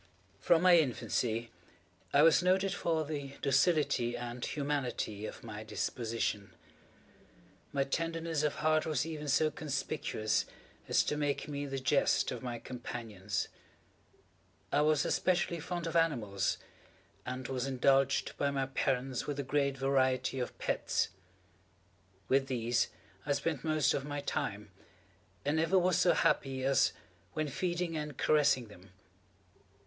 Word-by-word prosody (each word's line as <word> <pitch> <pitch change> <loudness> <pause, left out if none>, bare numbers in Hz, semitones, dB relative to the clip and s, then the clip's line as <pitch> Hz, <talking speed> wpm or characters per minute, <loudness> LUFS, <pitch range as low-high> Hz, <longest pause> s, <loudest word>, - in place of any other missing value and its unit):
From 170 0 +3
my 180 -2 +8
infancy 120 -4 -1 0.6
I 145 - +5
was 165 -1 +6
noted 190 +2 +2
for 165 -3 0
the 145 -2 -5
docility 140 -5 +2
and 120 0 -6
humanity 130 -8 -2
of - - -9
my 110 -2 -7
disposition. 110 -3 -2 1.2
My 140 -1 +1
tenderness 165 +2 -1
of 150 -1 0
heart 155 0 +2
was 150 -2 0
even 155 -2 -5
so 155 +2 +3
conspicuous 140 -8 -1 0.4
as - - +3
to 150 - -1
make 145 -1 -1
me 145 -1 -4
the 135 0 -3
jest 135 +2 +2
of 125 - -5
my 120 -2 -4
companions. 115 -5 -4 1.2
I 145 - +3
was 155 0 +3
especially 175 -1 +1
fond 175 +2 -4
of 165 - -4
animals, 120 -12 +1 0.7
and 130 0 -5
was 130 0 -2
indulged 135 +1 +2
by 140 - +1
my 135 -1 0
parents 130 -1 -1
with 145 -1 -2
a - - 0
great 140 0 0
variety 130 -1 +1
of 125 - -4
pets. - - 0 1.2
With 135 0 +3
these 120 -2 +1 0.4
I 145 - +1
spent 140 0 -2
most 155 -2 +2
of 135 - -1
my 145 0 -4
time, - - -3 0.7
and 145 +2 +1
never 165 +4 +3
was 185 0 +3
so 175 - +5
happy 135 -1 +1
as 135 0 +3 0.4
when 155 -1 -1
feeding 175 +2 -2
and 150 -3 -4
caressing 145 -5 +3
them. 95 -2 -16
140 Hz, 135 wpm, -32 LUFS, 125-155 Hz, 1.2 s, my